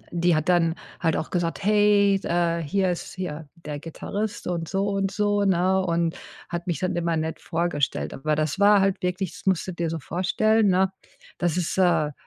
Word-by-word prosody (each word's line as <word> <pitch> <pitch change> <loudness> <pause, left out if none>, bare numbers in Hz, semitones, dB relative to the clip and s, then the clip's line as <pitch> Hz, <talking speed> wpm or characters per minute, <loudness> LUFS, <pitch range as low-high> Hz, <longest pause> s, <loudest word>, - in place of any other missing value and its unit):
die 170 -1 +2
hat 155 +3 -2
dann, 170 -2 +3 0.2
halt 165 -3 +1
auch 155 - -3
gesagt: 175 +2 -2
,,Hey, 205 -1 +4
äh, 170 -1 0
hier 185 +5 +1
ist 175 - -6
hier 160 -5 -5
der 150 -3 -7
Gitarrist" 205 +6 -5
und 170 -2 -2
so 195 +1 0
und 195 -1 0
so, 205 0 +1
ne? 190 0 +2
Und 170 -1 0 0.3
hat 175 +1 -5
mich 170 - -1
dann 185 0 -1
immer 170 -1 0
nett 160 0 -3
vorgestellt. 165 -4 -1
Aber 150 +2 -1
das 155 +5 -1
war 205 0 +6
halt 195 -1 +1
wirklich, 180 0 -2
das - - -13
musst 190 -3 +2
du 185 - -4
dir 170 -1 -2
so 165 - -3
vorstellen, 205 +8 +1
ne, 190 +1 +2 0.5
das 175 -1 0
ist, 180 0 -1
äh, 165 -5 +3
175 Hz, 195 wpm, -25 LUFS, 165-195 Hz, 0.5 s, war